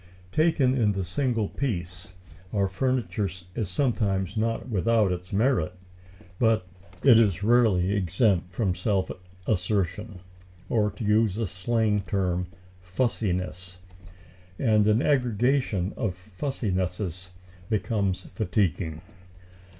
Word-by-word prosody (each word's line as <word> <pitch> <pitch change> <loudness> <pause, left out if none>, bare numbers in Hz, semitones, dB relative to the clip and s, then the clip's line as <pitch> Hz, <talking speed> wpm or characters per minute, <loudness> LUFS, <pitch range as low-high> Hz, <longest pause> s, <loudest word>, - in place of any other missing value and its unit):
Taken 155 -4 +3
in 110 -6 +2
the 95 -1 -2
single 115 +4 0
piece, 90 -9 -4 0.4
our 100 -2 +1
furniture 115 -1 -1 0.2
is 105 -3 -2
sometimes 100 -4 0
not 115 +2 -1
without 110 -2 +2
its 90 0 -5
merit, 105 - +1 0.7
but 115 -5 +3 0.4
it 120 -5 +8
is 100 -5 +2
rarely 105 -5 +3
exempt 95 -1 +1
from 95 -2 0
self 95 +1 0 0.3
assertion, 100 +1 -1 0.5
or, 105 -3 +2
to 105 +3 -8
use 105 -1 +2
a 115 - 0
slang 105 +3 0
term, 90 -1 0 0.3
"fussiness." 90 -3 -2 0.8
And 110 -4 +3
an 110 +4 +3
aggregation 125 -6 +1
of 100 -6 -2
"fussinesses" 90 - -3 0.4
becomes 100 -3 -1
fatiguing. 95 -7 -1
105 Hz, 105 wpm, -26 LUFS, 90-115 Hz, 0.8 s, it